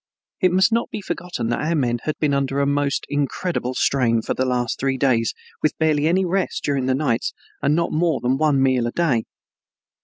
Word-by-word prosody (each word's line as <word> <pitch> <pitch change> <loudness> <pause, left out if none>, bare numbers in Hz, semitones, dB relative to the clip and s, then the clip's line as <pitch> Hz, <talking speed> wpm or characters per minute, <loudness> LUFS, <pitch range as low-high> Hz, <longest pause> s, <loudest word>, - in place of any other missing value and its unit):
It 185 -3 +3
must 190 +5 +4
not 230 +1 +1
be - - -5
forgotten 175 - -4
that 120 - -1
our 160 +3 0
men 120 -5 0
had 155 - -2
been 150 -2 +1
under 140 0 0
a 140 - +2
most 140 0 0
incredible 145 -2 -2
strain 115 -5 +2
for - - -1
the 130 - -1
last 125 -2 -1
three 135 0 0
days 120 -4 +1 0.3
with 155 - 0
barely 155 -1 +2
any 185 +3 +2
rest 185 +1 -1
during 135 -3 0
the 130 - +2
nights 130 -5 0 0.3
and 145 +1 +2
not 170 +1 0
more 160 -2 +1
than 125 +2 +1
one 145 -4 +3
meal 130 -3 +2
a - - -3
day. 140 -9 +1
140 Hz, 210 wpm, -22 LUFS, 130-160 Hz, 0.3 s, must